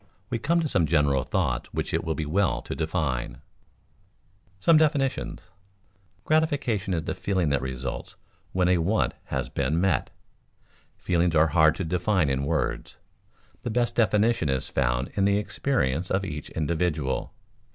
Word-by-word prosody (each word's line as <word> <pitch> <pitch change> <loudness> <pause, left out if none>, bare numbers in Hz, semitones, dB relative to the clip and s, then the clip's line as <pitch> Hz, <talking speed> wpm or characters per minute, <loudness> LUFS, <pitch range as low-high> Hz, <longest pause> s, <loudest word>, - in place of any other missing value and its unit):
We 115 - -1
come 170 +8 +2
to 160 - 0
some 90 - +1
general 70 -4 +2
thoughts 60 -1 -1
which - - -3
it - - 0
will 80 -1 -2
be 80 - -3
well 95 +7 +1
to - - -5
define. 80 -6 -2
[Sidenote: - - -23 1.2
Some 165 - +6
definitions] 145 -4 +1 0.8
Gratification 140 - +1
is 80 - -2
the - - -3
feeling 95 -6 0
that 70 -2 +1
results 65 -1 -5 0.4
when 90 -1 +1
a 90 -1 +3
want 100 +7 +1
has - - -2
been 80 +2 -1
met. 95 -3 +1 0.9
Feelings 85 -2 +1
are 80 +1 +5
hard 80 -1 +5
to 95 - -3
define 90 -2 +1
in 65 +1 -1
words; 75 -2 -2 0.6
the - - -4
best 120 +1 0
definition 105 -5 +2
is 65 -1 -1
found - - 0
in 100 - +1
the 100 0 +3
experience 95 - -1
of 95 +1 0
each 75 -4 -6
individual. 80 -3 -1
85 Hz, 155 wpm, -26 LUFS, 75-105 Hz, 1.2 s, Some